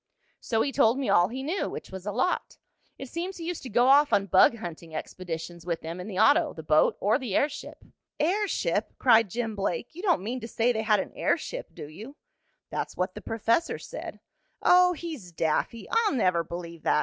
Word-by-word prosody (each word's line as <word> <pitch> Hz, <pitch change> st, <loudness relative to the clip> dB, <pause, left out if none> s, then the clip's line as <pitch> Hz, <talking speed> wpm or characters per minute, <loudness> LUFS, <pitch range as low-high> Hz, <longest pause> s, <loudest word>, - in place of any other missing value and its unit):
"So 225 Hz, -1 st, 0 dB
he 280 Hz, -, -1 dB
told 255 Hz, -3 st, +3 dB
me 275 Hz, -, -2 dB
all 175 Hz, +1 st, +5 dB
he 255 Hz, +5 st, -6 dB
knew, 330 Hz, +8 st, -1 dB
which -, -, -8 dB
was 190 Hz, +1 st, -8 dB
a -, -, 0 dB
lot. 255 Hz, -, -1 dB, 0.4 s
It 270 Hz, -, -7 dB
seems 350 Hz, +7 st, -5 dB
he 335 Hz, -, -7 dB
used 350 Hz, -1 st, -4 dB
to 260 Hz, -, -7 dB
go 240 Hz, +3 st, +3 dB
off 285 Hz, +2 st, +6 dB
on 200 Hz, -, +3 dB
bug 190 Hz, +4 st, +5 dB
hunting 165 Hz, -5 st, -8 dB
expeditions 170 Hz, 0 st, -6 dB
with 170 Hz, -2 st, -3 dB
them 165 Hz, +2 st, -6 dB
in 180 Hz, -, -6 dB
the 195 Hz, -4 st, -6 dB
auto, 290 Hz, -, +4 dB
the 160 Hz, -, -9 dB
boat 155 Hz, 0 st, +3 dB
or 215 Hz, +6 st, +2 dB
the 240 Hz, -8 st, -3 dB
airship." 285 Hz, 0 st, -2 dB, 0.3 s
"Airship!" 395 Hz, +6 st, 0 dB
cried 230 Hz, -4 st, +5 dB
Jim 225 Hz, +1 st, -3 dB
Blake. 200 Hz, -, -3 dB
"You 345 Hz, -, -8 dB
don't 360 Hz, -, +2 dB
mean 245 Hz, +5 st, -3 dB
to 230 Hz, -, -7 dB
say 235 Hz, +1 st, +1 dB
they 220 Hz, -2 st, -1 dB
had 215 Hz, -2 st, +3 dB
an -, -, -8 dB
airship, -, -, -2 dB
do -, -, -8 dB
you?" 220 Hz, -, -10 dB, 0.6 s
"That's -, -, -4 dB
what 185 Hz, +1 st, -1 dB
the -, -, -8 dB
professor 230 Hz, +8 st, 0 dB
said." -, -, -8 dB, 0.4 s
"Oh, 360 Hz, 0 st, +6 dB
he's 310 Hz, -, -7 dB
daffy! 165 Hz, +8 st, -1 dB
I'll 455 Hz, -5 st, +2 dB
never 180 Hz, -9 st, +2 dB
believe 170 Hz, 0 st, -8 dB
that. -, -, +2 dB
225 Hz, 210 wpm, -27 LUFS, 180-285 Hz, 0.6 s, off